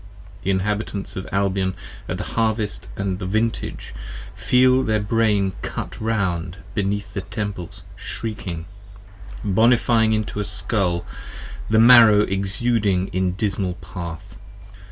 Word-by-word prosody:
The - - -3
Inhabitants 100 +1 -1
of 95 - -5
Albion 95 -1 0 0.3
at - - -2
the - - -3
Harvest 110 - -1
& - - -13
the 95 +3 -2
Vintage 110 +5 -2 0.4
Feel 130 +1 +4
their 110 -4 +1
Brain 105 -2 +2
cut - - -5
round 95 -5 -1 0.2
beneath 100 0 -2
the 95 - -2
temples 100 -3 -5
shrieking, 95 -7 -5 0.8
Bonifying 110 +2 +3
into 110 -1 -2
a - - 0
Scull, 95 -2 -1 0.6
the 110 - +3
Marrow 115 -3 +8
exuding 100 0 +1
in 95 0 0
dismal 95 -2 -1
path. 90 +2 -8
100 Hz, 115 wpm, -22 LUFS, 95-110 Hz, 0.8 s, Marrow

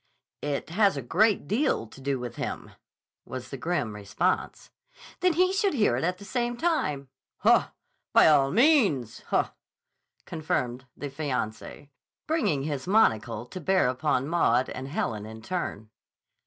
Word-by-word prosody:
"It 145 +2 -3
has 200 -3 +3
a - - -2
great 200 - +2
deal 220 - +1
to 125 +4 -14
do 135 0 -1
with 125 -1 -7
him," - - -5 0.5
was 130 -1 -7
the - - -4
grim 130 -6 -2
response. 105 - -2 0.5
"Then 365 -1 +3
he 365 +3 +3
should 390 -3 +1
hear 215 -5 +3
it - - -2
at 180 +2 0
the 200 - -12
same 240 +1 -2
time." 150 - -1 0.3
"Haw! - - +4 0.4
By - - +6
all 140 -3 +5
means. 210 - +3
Haw!" - - 0 0.7
confirmed 130 -6 -3
the 145 -1 -5
fiancé, 135 -2 -4 0.4
bringing 235 - 0
his 145 0 -4
monocle 115 - +2
to 180 +9 -8
bear 190 -1 +3
upon 130 0 0
Maud 130 -7 +2
and 130 +1 -6
Helen 110 -7 -3
in 110 0 -10
turn. 110 - -4
145 Hz, 150 wpm, -27 LUFS, 125-200 Hz, 0.7 s, By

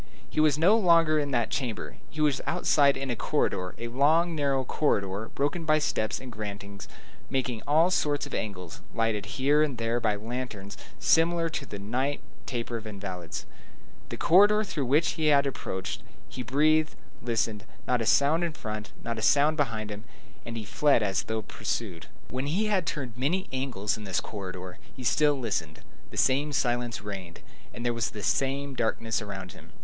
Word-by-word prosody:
He - - -3
was 155 -2 +4
no 180 +7 +5
longer 165 -6 +5
in 145 -1 -1
that 120 -4 0
chamber; 110 - -3
he 155 - -5
was 145 -3 +2
outside 140 -2 +3
in 135 -1 -3
a - - -1
corridor, 90 -4 -1
a 120 +1 -5
long, 155 +8 +3
narrow 140 -3 +1
corridor, 105 -6 0
broken 145 +4 0
by 155 -1 +4
steps 110 -7 0
and 130 -1 -9
gratings, 100 -2 -7 0.4
making 130 -4 -1
all 160 +5 +4
sorts 145 -5 +1
of - - -10
angles, 90 -5 -4
lighted 115 -3 0
here 145 +3 +4
and 145 -5 +1
there 115 +1 0
by 110 -3 +1
lanterns 110 -2 -5 0.2
similar 165 0 +3
to 145 -3 -4
the 100 - -6
night 125 +8 -1 0.3
taper 120 -2 -3
of 110 -1 -8
invalids, 95 -5 -6 0.6
the - - -5
corridor 205 +4 +6
through 155 - -3
which 150 +5 +3
he 155 -1 0
had 140 -2 +5
approached. 95 -8 -4 0.3
He 125 - -6
breathed, 155 +5 +2 0.2
he - - -15
listened; 110 -2 0 0.2
not 125 -2 +2
a 110 - -1
sound 140 +8 +4
in 170 -2 -1
front, 110 -4 -6
not 115 -1 -3
a - - -4
sound 145 +6 +4
behind 115 -8 -1
him, 105 +2 -7 0.4
and 115 -1 -6
he 110 - -5
fled 120 +3 +3
as 95 -2 +1
though 110 -1 -3
pursued. 95 -4 -4 0.2
When 130 +2 -2
he 185 +9 +1
had 195 -5 +1
turned 130 -8 -3
many 160 +10 0
angles 120 -6 -1
in 105 - -8
this 95 -2 0
corridor, 95 -3 -7 0.2
he 130 - -8
still 145 +4 +3
listened. 95 - -3 0.3
The - - -10
same 140 +3 +3
silence 120 -4 0
reigned, 95 -5 -7 0.3
and 120 - -7
there 120 - +2
was 115 -2 -1
the 105 - -8
same 135 +6 0
darkness 115 -1 -1
around 95 -3 -6
him. - - -15
125 Hz, 185 wpm, -28 LUFS, 105-150 Hz, 0.6 s, corridor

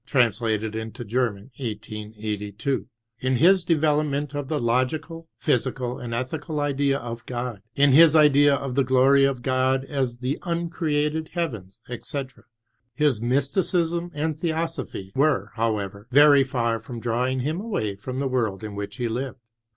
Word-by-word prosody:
translated 110 -4 +1
hito 110 +2 -5
German. 120 0 -2
1882; 105 0 -4 0.3
in 130 0 +1
his 180 +7 +5
development 150 -3 +1
of 145 -2 -3
the 150 +1 -1
lo^cal, 145 +7 -1
physical, 125 -2 -1
and 120 - -6
ethical 150 +6 -3
idea 140 -1 +1
of 120 -2 -6
God; 120 -4 -4
in 140 0 +5
his 160 +3 +7
idea 145 -2 +6
of 135 -2 -4
the 135 +1 +3
glory 130 +2 +5
of 135 -3 -1
God 130 0 +1
as 130 -4 -2
the 130 +3 -2
uncreated 160 -3 -1
heavens, 115 - -4
etc. 130 +2 -6 0.5
His 145 -7 +2
mysticism 165 +7 0
and 155 0 -2
theosophy 160 - -3
were, 135 -8 +2
however, 105 -2 -2
very 145 +1 +7
far 115 -4 -1
from 115 +2 -8
drawing 125 +3 0
him 155 +8 -2
away 110 - -2
from 130 +6 -6
the 135 0 0
world 115 -6 -1
in 105 -1 -5
which 100 +2 -6
he 120 -2 -1
lived. 125 +3 -3
130 Hz, 145 wpm, -24 LUFS, 115-150 Hz, 0.5 s, his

